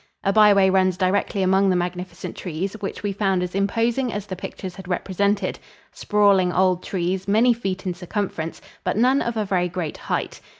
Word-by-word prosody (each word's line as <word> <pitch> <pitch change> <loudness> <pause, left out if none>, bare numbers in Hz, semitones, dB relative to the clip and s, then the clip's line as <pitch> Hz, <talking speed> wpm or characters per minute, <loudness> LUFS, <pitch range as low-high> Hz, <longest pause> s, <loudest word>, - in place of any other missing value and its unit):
A 195 - +2
byway 200 -3 +6
runs 185 -1 +2
directly 195 +1 +1
among 190 +1 +3
the 185 - +2
magnificent 180 0 -4
trees, 180 +2 -4
which 200 0 -5
we 205 -1 -1
found 195 -2 +1
as 180 - -4
imposing 230 +6 0
as 205 -1 -4
the 190 - -5
pictures 185 0 -7
had 190 -1 -11
represented 195 +2 -1 0.3
sprawling 200 -3 +3
old 185 -1 +2
trees, 185 +1 -2
many 225 +5 +4
feet 195 -4 -4
in 180 - -1
circumference, 175 -2 -4 0.2
but - - -1
none 255 +5 +3
of 235 0 -2
very 180 -2 +1
great 170 -3 -4
height. - - -3
190 Hz, 175 wpm, -23 LUFS, 180-205 Hz, 0.3 s, byway